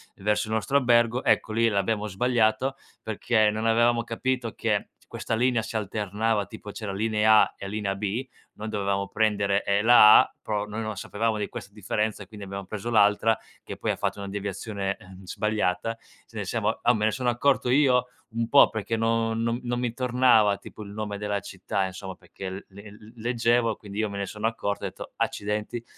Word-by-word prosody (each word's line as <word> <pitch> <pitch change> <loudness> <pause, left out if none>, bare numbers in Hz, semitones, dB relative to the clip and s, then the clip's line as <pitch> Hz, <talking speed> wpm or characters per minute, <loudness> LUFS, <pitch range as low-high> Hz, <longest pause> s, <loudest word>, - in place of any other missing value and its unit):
verso 105 +2 0
il 110 - -1
nostro 125 +6 +1
albergo, 120 -1 +3
ecco, 110 - +2
lì 115 +1 +3
l'abbiamo 105 +1 0
sbagliato, 115 +4 +1 0.3
perché 110 0 +2
non 110 +1 -2
avevamo 115 +1 +3
capito 120 0 -2
che - - -1 0.3
questa - - -2
linea 120 0 +2
si 110 +1 -7
alternava, 105 0 -1
tipo 105 - -9
c'era 105 -1 -5
linea 110 +1 +4
A - - 0
e 100 - -7
linea 105 -1 -2
B, 105 +6 -3 0.3
noi 110 - -7
dovevamo 100 -2 -1
prendere, 100 -2 +1
ehm, 100 +1 +1
la 115 -3 +9
A, - - -5
però 105 -1 -2
noi 105 +2 -5
non 110 -1 -4
sapevamo 110 +3 -2
di 105 - -3
queste 100 - -8
differenze, 105 0 -2
quindi 100 0 -10
abbiamo 100 0 -6
preso 105 +4 -5
l'altra, 110 0 +4 0.2
che - - -8
poi - - -1
ha - - -2
fatto - - -2
una 100 -1 -6
deviazione, 100 0 -4
ehm, 95 +1 -14
sbagliata, 105 +2 -1 0.3
ce - - -21
ne - - -3
siamo - - -1
uhm, 120 -1 +3
me 105 - 0
ne 110 - +3
sono 125 +1 -1
accorto 125 +1 +1
io, 125 -2 +4 0.2
un 115 +1 -3
po' 140 - +7
perché 110 +1 -3
no 115 0 +1
non 115 +1 -1
non 120 0 -2
mi 120 -2 -2
tornava 120 -5 +3
tipo - - -12
il 100 - -8
nome 105 0 -5
della 105 -1 -1
città, 95 0 -3
insomma, 95 0 -7
perché 90 +2 -11
il 95 +1 -6
le 100 +2 -12
l 100 - -14 0.2
le 115 - -12
leggevo, 115 -1 +1
quindi 100 0 -8
io 110 -1 0
me 100 - -6
ne 100 - -2
sono 105 +3 -3
accorto, 100 -3 -3
ho - - 0
detto: - - -9
“Accidenti. 105 +3 -2
110 Hz, 200 wpm, -26 LUFS, 100-115 Hz, 0.3 s, la